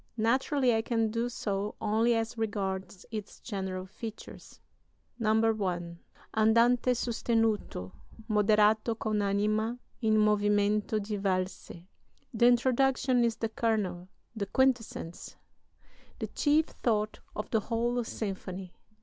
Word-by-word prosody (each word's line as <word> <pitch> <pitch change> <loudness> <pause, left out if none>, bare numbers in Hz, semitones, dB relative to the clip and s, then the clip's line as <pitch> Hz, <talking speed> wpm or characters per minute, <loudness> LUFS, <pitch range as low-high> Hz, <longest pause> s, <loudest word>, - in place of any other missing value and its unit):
Naturally, 255 +3 +2
I 225 - +2
can 225 -1 0
do 230 +2 -1
so 205 -3 -3
only 225 +2 +2
as 225 0 -2
regards 195 -4 -3
its 215 -2 -6
general 190 -4 -4
features. 220 +3 -9 0.6
"[I. 210 -6 +1 0.4
Andante 235 +3 +4
sostenuto; 225 - -1 0.4
Moderato 215 +1 +3
con 215 -2 -1
anima 215 +3 0 0.2
in 220 -2 +3
movimento 210 0 +2
di 210 0 -3
valse] 185 -3 -3 0.5
"The 235 +1 +4
Introduction 255 +1 +3
is 230 -1 +1
the 225 -1 -2
kernel, 205 -6 -1 0.3
the 200 -3 -3
quintessence, 225 -7 -1 0.8
the - - -3
chief 305 +1 +2 0.2
thought 215 -2 0 0.2
of 210 - -5
the 225 - +3
whole 235 +3 -1
symphony. 190 -4 -5
215 Hz, 110 wpm, -30 LUFS, 200-230 Hz, 0.8 s, Andante